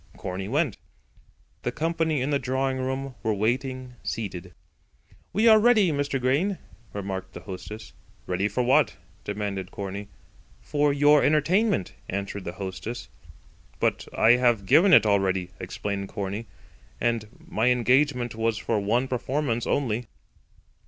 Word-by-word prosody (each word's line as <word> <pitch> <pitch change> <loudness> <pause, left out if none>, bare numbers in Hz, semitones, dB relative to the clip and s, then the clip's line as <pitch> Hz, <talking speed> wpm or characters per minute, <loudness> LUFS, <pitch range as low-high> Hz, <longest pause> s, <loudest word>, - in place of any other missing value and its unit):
Corney 95 0 -4
went. 135 -2 0 0.8
The 120 - -2
company 160 0 0
in 140 - -1
the 140 - +2
drawing 130 0 -1
room 130 +1 -3
were 110 -1 0
waiting, 130 +3 -2
seated. 90 -5 -5 0.8
"We 215 +5 +3
are 220 -1 +8
ready, 215 -6 +5
Mr. 140 -2 -1
Grain," 145 +10 +1 0.3
remarked 95 -1 -5
the - - -8
hostess. 105 +2 -8 0.3
"Ready 90 +6 0
for 115 +5 -1
what?" 125 +2 +3 0.3
demanded 100 -2 -3
Corney. 100 +1 -6 0.5
"For 145 - +1
your 145 +1 +5
entertainment," 155 - +2 0.2
answered 100 0 -4
the 85 - -4
hostess. 95 0 -6 0.7
"But - - 0
I 110 - +5
have 120 -5 +2
given 180 - +5
it 115 - +8
already," 95 -3 +1
explained 100 -1 -4
Corney; 100 +2 -4 0.5
"and 115 -2 0
my 110 +3 -1
engagement 125 0 +2
was 115 0 0
for 110 0 0
one 115 +6 +1
performance 130 -1 -1
only." 120 -4 0
120 Hz, 130 wpm, -26 LUFS, 100-140 Hz, 0.8 s, are